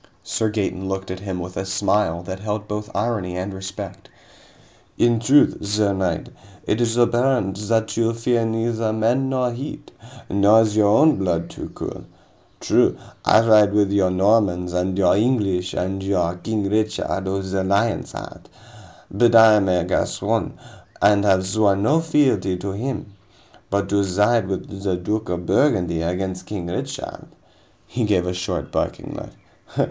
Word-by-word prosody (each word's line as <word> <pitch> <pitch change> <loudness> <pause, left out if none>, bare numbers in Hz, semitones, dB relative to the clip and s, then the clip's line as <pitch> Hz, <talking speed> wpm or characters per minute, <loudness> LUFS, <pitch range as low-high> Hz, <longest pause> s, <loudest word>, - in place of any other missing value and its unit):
Sir 110 - -1
Gaeton 95 -3 -3
looked 95 -1 -4
at 95 - -5
him 95 -2 -5
with 90 +1 -7
a - - -2
smile 95 -3 0
that 95 +1 -6
held 105 +1 -4
both 105 0 -5
irony 100 -4 -2
and 95 +2 -4
respect. 95 0 -8 0.9
"In 120 -1 +3
truth, 135 +6 +3
sir 105 0 +1
knight, 95 -4 -2 0.4
it 110 - 0
is 115 0 0
apparent 120 -4 +2
that 110 0 0
you 115 0 +1
fear 115 0 +1
neither 115 0 -1
men 120 +5 +1
nor 130 -2 0
heat. 135 +5 -7 0.4
Nor 100 +3 +5
is 105 -1 -2
your 105 -1 +4
own 145 +9 +4
blood 90 -3 -1
too - - -8
cool. - - -7 0.5
True, - - +2 0.3
I 115 +2 +4
ride 105 -2 +5
with 100 -1 +2
your 100 -2 +2
Normans 90 -2 +1
and 90 +1 -1
your 95 -2 +4
English 100 -5 0
and 95 +2 -2
your 95 -3 0
King 105 +1 -2
Richard 105 -2 -1
of 95 0 -2
the 95 -1 0
Lion's 100 +4 0
Heart, - - -10 0.6
but 115 +3 +3
I 110 -1 +8
am 100 -3 +2
a 90 -2 +2
Gascon, 90 - -1 0.5
and 100 -1 +4
have 95 -2 +3
sworn 100 0 +1
no 150 +8 +3
fealty 130 - +1
to 95 +2 -4
him. 110 0 -5 0.6
But 100 0 0
to 100 0 +2
side 105 +3 +2
with 95 0 -5
the 95 -2 -1
Duke 105 +5 -3
of 90 -1 -3
Burgundy 90 - +1
against 90 +2 -3
King 100 -5 -5
Richard 85 +1 -6 0.3
" - - -35
He 120 - -3
gave 95 -4 +1
a 90 - -2
short, 90 +1 -4
barking - - -3
laugh. - - -9
100 Hz, 165 wpm, -21 LUFS, 95-110 Hz, 0.9 s, I